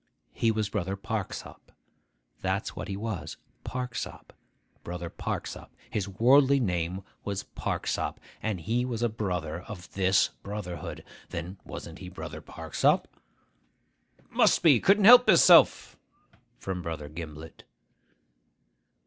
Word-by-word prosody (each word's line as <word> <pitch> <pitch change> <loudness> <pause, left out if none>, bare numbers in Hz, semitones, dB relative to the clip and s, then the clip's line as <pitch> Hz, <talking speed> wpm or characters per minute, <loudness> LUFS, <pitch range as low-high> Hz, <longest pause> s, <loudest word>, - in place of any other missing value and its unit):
He 115 - +1
was 110 -1 0
Brother 95 -2 -2
Parksop. 100 0 -6 0.7
That's 95 +2 -2
what - - -5
he 95 -2 -4
was. 100 -8 -5 0.3
Parksop; 125 -1 -5 0.5
Brother 85 -1 -6
Parksop. - - -5 0.2
His 100 -2 -2
worldly 135 +7 +5
name 90 -3 -1 0.2
was 100 -1 -3
Parksop, - - -3 0.2
and 105 -5 -2
he 115 +8 0
was 120 -2 -3
a 120 - +2
brother 90 -7 -3
of 90 -2 -10
this 95 0 +3
brotherhood. 100 -4 -6 0.3
Then 85 +3 -6
wasn't - - -8
he - - -8
Brother - - -8
Parksop?' - - 0 1.3
('Must - - +3
be. 145 -8 +7
Couldn't 200 - +4
help 245 +1 +9
hisself!' 175 -6 +6 0.6
from 95 -2 -4
Brother 80 -3 -5
Gimblet.) 80 0 -9
100 Hz, 115 wpm, -28 LUFS, 90-115 Hz, 1.3 s, help